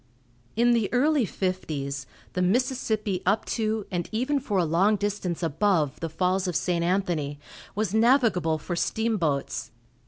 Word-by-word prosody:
In 240 +2 +4
the 230 -4 +1
early 280 +1 +3
fifties, 145 -9 -3 0.3
the 180 - -1
Mississippi 215 -1 0
up 205 +4 +1
to, 220 -2 -1
and 175 -2 -2
even 260 +6 0
for 215 -7 -2
a 180 - +3
long 185 +7 +3
distance 200 -4 -2
above, 160 -3 +1
the 165 - -3
Falls 185 +4 0
of 180 - -2
St. 175 -2 0
Anthony 170 -6 0 0.4
was 210 -2 -1
navigable 220 - +3
for 175 +3 -4
steamboats. 175 -11 -1
190 Hz, 145 wpm, -26 LUFS, 170-220 Hz, 0.4 s, In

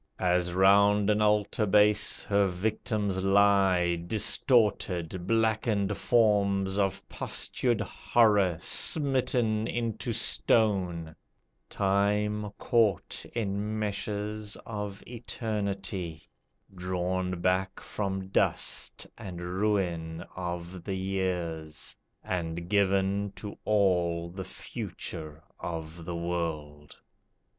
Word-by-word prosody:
As 90 -1 +1
'round 100 +3 +4
an 105 0 +1
altar 105 0 +2
base 105 +1 +4
Her 100 -1 +3
victims 100 +1 -2
lie, 95 -3 +4
distorted, 95 -5 +2
blackened 110 -2 +1
forms 100 -4 +2
Of 95 -2 -1
postured 120 -4 -1
horror 105 -4 +2
smitten 120 - +2
into 115 -3 -2
stone, 90 -8 +1 0.5
Time 105 +2 0
caught 110 -6 +1
in 105 -1 -2
meshes 105 0 -3
of 105 -2 -6
Eternity 100 -8 -4 0.5
Drawn 90 0 -2
back 95 +2 0
from 95 -2 -4
dust - - +1
and 95 -6 -7
ruin 90 -3 -1
of 90 0 -5
the 95 0 -3
years, 90 -5 -3 0.3
And 85 -1 -3
given 100 0 +1
to 100 +2 -7
all 90 -5 +1
the 95 +1 -6
future 80 -1 -7 0.2
of 80 0 -6
the 85 - -4
world. 80 -4 -4
95 Hz, 90 wpm, -28 LUFS, 90-105 Hz, 0.5 s, round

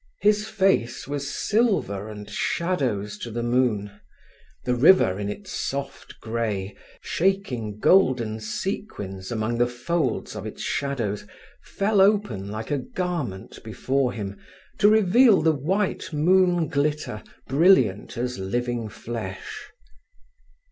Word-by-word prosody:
His 210 +1 +3
face 190 - +1
was 140 -1 -3
silver 195 - 0
and 105 -1 -8
shadows 130 - -1
to 120 - -6
the 120 +1 -3
moon; 120 -4 +1 0.7
the 125 - +1
river, 125 - +5
in 100 0 -3
its 185 - -7
soft 140 0 -5
grey, 110 -4 -3 0.3
shaking 135 - -1
golden 120 - +3
sequins 110 - -5
among 115 +1 -1
the 120 - +4
folds 130 +5 -2
of - - -5
its - - -7
shadows, 120 -8 -2 0.3
fell 200 0 +1
open 195 - +2
like 110 +4 -5
a 145 - +1
garment 145 - -4
before 130 +4 0
him, 100 -4 -6 0.4
to 205 - +6
reveal 220 +1 +5
the 160 - +5
white 185 +9 -1
moon 175 +2 +3
glitter 145 -7 -1 0.3
brilliant 130 - +3
as 125 -2 -3
living 120 +3 -2
flesh. 110 -3 -7
125 Hz, 120 wpm, -24 LUFS, 110-180 Hz, 0.7 s, to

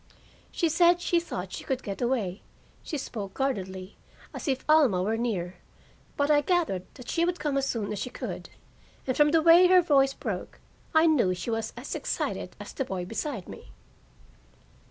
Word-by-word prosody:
She 340 - +1
said 345 +2 +4
she 345 0 +2
thought 190 - -6
she - - -6
could 265 -2 -2
get 200 +2 -5
away; 230 -7 -1 0.4
she 305 - -4
spoke 205 -7 -6
guardedly, 190 -8 -3 0.4
as - - -6
if 265 -2 -1
Alma 280 -13 +4
were 215 +3 0
near, 190 -7 -2 0.6
but 285 +1 +2
I 295 -1 +5
gathered 310 - 0
that 250 -2 -12
she 335 - 0
would 355 +1 0
come 295 -2 -1
as 275 0 +1
soon 215 -6 -2
as 205 - -4
she 250 - -3
could, - - -6 0.6
and, 255 - -1
from 295 0 +5
the 320 +1 +3
way 340 +2 +8
her 365 0 +6
voice 275 -4 +3
broke, - - -5 0.4
I 315 +1 +6
knew 250 - +3
she 180 +6 -4
was 225 -1 -2
as 250 +4 -6
excited - - -3
as - - -9
the 270 - -2
boy 190 -7 -4
beside 225 - -4
me. - - -11
265 Hz, 185 wpm, -27 LUFS, 200-315 Hz, 0.6 s, way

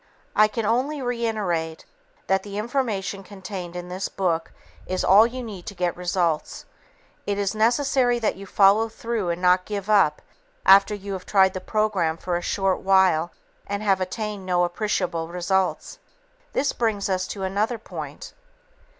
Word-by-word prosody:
I 215 - +6
can 220 +1 -3
only 260 +7 0
reiterate 215 -10 -2 0.4
that 190 0 +2
the 205 -1 -7
information 210 -4 -2
contained 190 -2 -8
in 175 0 -6
this 185 +2 -4
book 170 -4 -1 0.4
is 185 0 -1
all 205 +4 +7
you 250 +1 -6
need 200 -6 -9
to 200 - -6
get 175 -1 -1
results. 175 -3 -1 0.6
It 200 -1 0
is 200 0 0
necessary 245 +2 +2
that 225 -2 0
you 195 +1 -10
follow 205 +4 +4
through 225 -4 -3
and 170 0 -2
not 180 0 +4
give 205 0 -3
up 175 -8 +3 0.4
after 200 +2 +6
you 200 0 -6
have 185 -1 -7
tried 190 -2 +4
the 185 - -5
program 200 -8 0
for 180 +1 -3
a 175 - -1
short 195 +1 0
while 190 -4 +3 0.4
and 200 +1 -3
have 195 -3 +2
obtained 210 +1 -4
no 180 -1 +1
appreciable 175 -2 -1
results. 185 - -1 0.5
This 280 - +1
brings 220 -4 0
us 185 -1 -1
to 195 - -5
another 205 +5 0
point. 220 - -8
195 Hz, 160 wpm, -24 LUFS, 180-215 Hz, 0.6 s, all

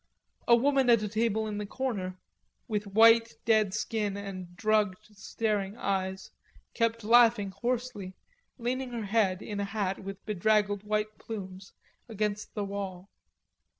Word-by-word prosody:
A 235 - +8
woman 270 +1 +3
at 230 -3 +5
a - - -1
table 220 +1 0
in 210 -1 -4
the 210 - -3
corner, 200 -7 -3 0.5
with 210 -2 -2
dead 200 - -11
white 225 -2 +5
skin 210 -2 -2
and 185 -3 -7
drugged 215 -2 +1
staring 205 0 -2
eyes, 190 -1 -2 0.4
kept 230 -1 0
laughing 230 -3 +5
hoarsely, 225 -2 -3 0.4
leaning 255 +1 -2
her 230 -3 -3
head, 200 -3 +1
in 205 -2 -5
a - - 0
hat 200 -2 -2
with 195 0 -8
bedraggled 210 0 +1
white 215 0 -2
plumes, 190 -4 -8 0.4
against 210 -1 -3
the 205 -2 -2
wall. 195 -1 -6
210 Hz, 140 wpm, -29 LUFS, 195-225 Hz, 0.5 s, A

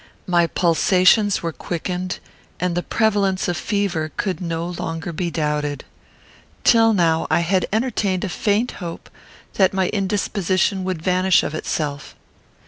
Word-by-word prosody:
My 175 -2 +3
pulsations 185 +5 +3
were 165 - -1
quickened, 180 +4 -4 0.4
and 180 -1 0
the 175 - 0
prevalence 200 -3 +1
of 175 - 0
fever 180 -5 -1
could 190 -4 -2
no 165 -1 -2
longer 165 -1 -5
be 175 +2 -2
doubted. 150 -2 -2 0.8
Till 225 -1 +5
now, 165 -5 +2
I - - +3
had 185 +2 +1
entertained 215 -5 0
a 205 - -2
faint 215 +6 0
hope 170 -2 -7 0.5
that 190 0 +4
my 190 -1 +1
indisposition 195 -1 0
would 185 -4 -3
vanish 185 0 +3
of - - -3
itself. 150 -2 -3
180 Hz, 135 wpm, -21 LUFS, 165-195 Hz, 0.8 s, Till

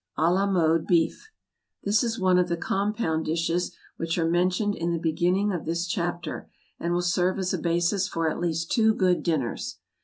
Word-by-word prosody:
=À 165 +3 +3
la 195 +2 +2
Mode 165 -4 +2
Beef.= 175 - +1 0.5
This 210 +3 +2
is 230 -1 -2
one 185 -1 +4
of 180 0 +1
the 170 - 0
compound 195 -3 -1
dishes 165 +2 -1 0.2
which 165 +1 -2
are 165 -1 +1
mentioned 180 +5 +1
in 170 -3 -2
the - - 0
beginning 175 +5 +1
of 175 - -4
this 170 +2 -1
chapter, 175 0 -3 0.3
and 170 - -2
will 175 0 +1
serve 180 +2 +1
as 190 -1 -1
a 185 - -1
basis 175 +4 +1
for 165 -4 -1
at 155 - -1
least 165 -1 -2
two 220 -1 +3
good 185 -3 +2
dinners. 150 -9 -2
175 Hz, 190 wpm, -26 LUFS, 165-190 Hz, 0.5 s, one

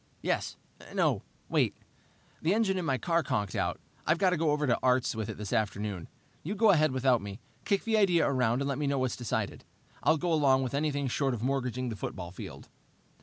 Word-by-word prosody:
"Yes - - -1 0.4
no, - - +2 0.3
wait. - - +1 0.7
The 170 +6 +2
engine 195 -4 +2
in 175 - -3
my 135 -4 +1
car 170 +4 +1
conked 105 - -1
out. - - -1 0.3
I've 155 - +4
got 185 +1 +3
to - - +2
go 160 -1 +1
over 150 0 +1
to 120 -4 +2
Art's 130 0 +2
with 110 -1 -3
it 110 - -5
this 105 +1 -5
afternoon. 105 -4 -1 0.3
You 195 +7 -4
go 215 0 +5
ahead 155 -5 +4
without 130 -2 +2
me. 100 +1 -7 0.3
Kick 200 - +1
the 225 -1 +2
idea 180 -5 +4
around 130 -1 +1
and - - -2
let 140 0 -1
me 145 - 0
know 140 0 +1
what's 130 -1 0
decided. 120 -5 -3 0.4
I'll 160 - +4
go 175 +2 0
along 135 -4 +4
with 130 - -3
anything 145 -1 0
short 135 +1 0
of 115 - -6
mortgaging 130 -1 -1
the 115 - -4
football 90 -3 -5
field." 95 - -9
135 Hz, 215 wpm, -30 LUFS, 120-160 Hz, 0.7 s, go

